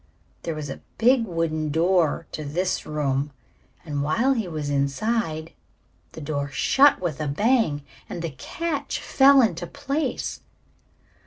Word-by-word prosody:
There 165 - -3
was 155 -1 -5
a 135 - -7 0.2
big 240 +1 +4
wooden 160 -3 -1
door 165 0 +2
to 155 - -5
this 175 +6 -2
room, 145 -2 -1 0.6
and 145 -3 -2
while 230 - +2
he 225 -7 -2
was 155 -3 -4
inside 155 - -1 0.6
the 160 - -8
door 145 -1 -2
shut 270 - +4
with 160 -5 -3
a 150 - -1
bang 180 - +2 0.3
and 170 - -5
the 165 - -3
catch 285 - -3
fell 275 -1 +6
into 175 -6 -1
place. 285 - -3
165 Hz, 140 wpm, -24 LUFS, 150-230 Hz, 0.6 s, fell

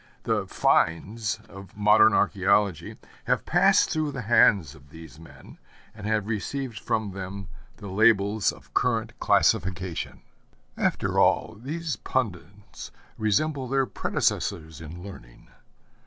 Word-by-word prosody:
The - - -1
'finds' 105 +7 0
of 95 0 -13
modern 105 +1 +5
archæology 100 -3 +1 0.3
have - - 0
passed - - +3
through 155 -2 -1
the 125 - -5
hands 100 - +4
of 70 -2 -18
these 80 0 -13
men, 80 - -15 0.3
and 105 -1 -8
have 110 -2 0
received 115 +3 -4
from 110 -2 -2
them 95 0 -7 0.3
the - - -11
labels 100 0 +3
of - - -17
current 115 -2 0
classification. 90 -1 0 0.5
After - - 0
all, - - +2
these 155 +6 -4
pundits 100 -5 -5 0.3
resemble 130 +6 0
their 135 +1 +1
predecessors 80 -8 -2
in 85 +3 -9
learning. 75 -12 -13
100 Hz, 120 wpm, -26 LUFS, 90-115 Hz, 0.5 s, modern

